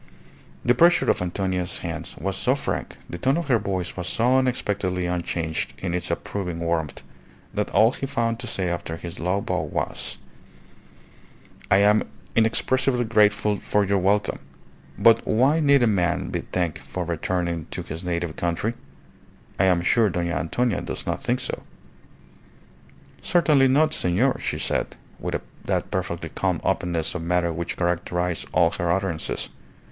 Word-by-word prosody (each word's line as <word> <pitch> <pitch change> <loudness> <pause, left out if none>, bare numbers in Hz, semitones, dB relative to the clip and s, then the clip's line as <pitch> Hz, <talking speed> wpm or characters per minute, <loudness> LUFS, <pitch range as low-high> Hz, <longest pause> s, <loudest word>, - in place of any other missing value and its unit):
The 125 - +5
pressure 170 +7 +5
of - - -2
Antonia's 90 0 -1
hand - - -5
was 95 +4 -2
so 125 +6 +2
frank, 140 - -3
the 85 - -7
tone 135 - +2
of 170 -4 -3
her 120 -3 +4
voice 95 -3 -3
was 90 -1 -4
so 125 +3 +2
unexpectedly 100 -8 -1
unchanged 85 -2 -2
in 90 -2 -3
its 90 -1 -2
approving 90 -4 -3
warmth, 85 -3 -2 0.5
that - - -1
all 110 +2 +5
he 135 - -4
found 115 -3 0
to 120 - -5
say 95 -5 -2
after 85 -1 -3
his 85 +1 -7
low 90 +4 0
bow 90 -2 -1
was - - -3 1.5
"I 95 - +6
am 105 +1 +3 0.3
inexpressibly 120 +3 +2
grateful 105 -1 +3
for 105 +1 +1
your 100 0 +2
welcome; 100 +2 +1 0.6
but 115 0 +5
why 135 +8 +3
need 140 -4 +5
a - - +6
man 95 -6 +1
be - - -2
thanked 85 -4 -1
for 90 -1 -5
returning 85 0 -2
to - - -4
his 80 +3 -6
native 85 -2 -2
country? 85 +6 -1 0.9
I 95 - +5
am 90 -2 +3
sure 110 +4 +4
Dona 85 -1 -1
Antonia 115 +8 0
does - - -5
not - - -2
think 125 -2 0
so." 130 - -4 1.6
"Certainly 150 -6 +4
not, 155 +4 +3
senor," 110 - +2
she - - -2
said, - - -1 0.2
with - - -2 0.3
that - - -1
perfectly - - -3
calm - - -1
openness 85 -3 0
of 90 - -4
manner 85 0 +1
which 85 +1 -4
characterized 90 -1 -1
all 85 -2 +4
her 85 -2 -1
utterances. 90 -3 -2
95 Hz, 155 wpm, -24 LUFS, 85-115 Hz, 1.6 s, I